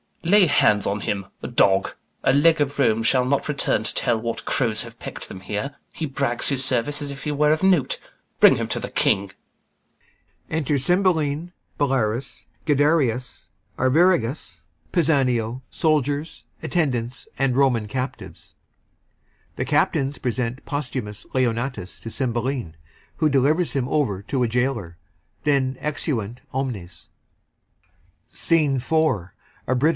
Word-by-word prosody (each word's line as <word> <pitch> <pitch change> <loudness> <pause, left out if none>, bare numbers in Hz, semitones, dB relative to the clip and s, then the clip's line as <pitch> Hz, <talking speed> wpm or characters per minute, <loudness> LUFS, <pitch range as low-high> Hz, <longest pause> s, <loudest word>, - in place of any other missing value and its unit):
Lay 190 +3 +5
hands 105 - +3
on 100 +1 -1
him; 100 -2 -2 0.2
a - - -3
dog! 95 0 +2 0.3
A - - +3
leg 160 +3 +4
of 145 -1 -1
Rome 115 -4 +3
shall 125 +2 +4
not 140 +2 0
return 140 -6 0
to - - 0
tell 120 -2 +1
What 115 0 -4
crows 115 -5 +3
have 115 -1 -12
peck'd - - -7
them 95 - -9
here. 105 +8 -4 0.2
He 160 - -4
brags 135 -4 0
his 135 -2 +5
service, 130 +3 +3
As 145 -1 -2
if 135 0 -8
he 150 - -2
were 150 +1 +2
of 155 +4 +1
note. 180 -9 +3 0.4
Bring - - +7
him - - -3
to - - +1
th' - - -7
King. 100 0 +1 1.2
Enter 150 -2 0
CYMBELINE, 170 0 +1 0.3
BELARIUS, 130 -4 -1 0.2
GUIDERIUS, 145 -5 +1 0.3
ARVIRAGUS, 140 -1 +1 0.3
PISANIO, 130 -7 +1 1.8
and 135 -2 +1
Roman 125 -6 +2
captives. 130 +4 -6 1.0
The - - -2
CAPTAINS 140 +1 +1
present 125 +1 -3
POSTHUMUS 125 -8 -5
to 120 -4 -2
CYMBELINE, 120 - -2 0.4
who 155 - +2
delivers 150 +5 +2
him 130 -3 -1
over 105 -11 0
to 130 +3 -1
a - - +2
gaoler. 115 -8 -2 0.5
Exeunt 130 -4 -1
omnes 100 - -5 1.2
SCENE 155 -4 +1
IV. 125 - -7 0.8
Britain. 130 +4 +2
130 Hz, 125 wpm, -23 LUFS, 115-145 Hz, 1.8 s, Bring